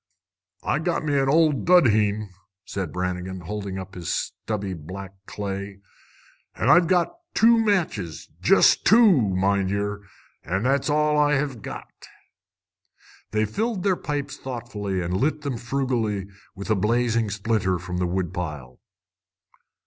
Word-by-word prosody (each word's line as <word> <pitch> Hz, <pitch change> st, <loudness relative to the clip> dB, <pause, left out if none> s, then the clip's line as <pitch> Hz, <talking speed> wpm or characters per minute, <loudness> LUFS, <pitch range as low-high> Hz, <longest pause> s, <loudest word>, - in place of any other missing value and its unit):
"I've 155 Hz, -, 0 dB
got 170 Hz, -2 st, -1 dB
me 145 Hz, -2 st, +2 dB
old 150 Hz, +1 st, +3 dB
dudheen," 110 Hz, -, +3 dB, 0.3 s
said 95 Hz, -6 st, -4 dB
Brannigan, 90 Hz, +1 st, -3 dB
holding 100 Hz, +2 st, -5 dB
up 95 Hz, 0 st, -7 dB
his 90 Hz, -3 st, -6 dB
stubby 100 Hz, -3 st, -3 dB
black 90 Hz, +4 st, -8 dB
clay. 100 Hz, -1 st, -5 dB, 0.8 s
"An' -, -, 0 dB
I've 175 Hz, -1 st, +6 dB
got 185 Hz, -, +1 dB, 0.2 s
two 230 Hz, 0 st, +5 dB
matches, 155 Hz, -, -1 dB
jest -, -, +5 dB
two, 225 Hz, +1 st, +7 dB
mind 100 Hz, -, +1 dB
yer! 100 Hz, +1 st, -2 dB, 0.4 s
An' 95 Hz, +5 st, -2 dB
that's 135 Hz, +3 st, +1 dB
all 150 Hz, 0 st, +2 dB
I 150 Hz, 0 st, +3 dB
hev 135 Hz, -5 st, -2 dB
got." -, -, -7 dB, 1.4 s
They 110 Hz, 0 st, +1 dB
filled 210 Hz, -, -2 dB
their 195 Hz, -2 st, +3 dB
pipes 145 Hz, -4 st, -4 dB
thoughtfully 105 Hz, -7 st, -4 dB
and 90 Hz, +2 st, -1 dB
lit 150 Hz, +7 st, 0 dB
them 140 Hz, -5 st, -3 dB
frugally 120 Hz, -6 st, -1 dB, 0.3 s
with 100 Hz, +3 st, -5 dB
a -, -, +4 dB
blazing 115 Hz, +2 st, +1 dB
splinter 105 Hz, -3 st, 0 dB
from 90 Hz, +1 st, -5 dB
the 90 Hz, 0 st, 0 dB
wood 90 Hz, 0 st, -2 dB
pile. 75 Hz, -9 st, -6 dB
105 Hz, 135 wpm, -24 LUFS, 95-145 Hz, 1.4 s, two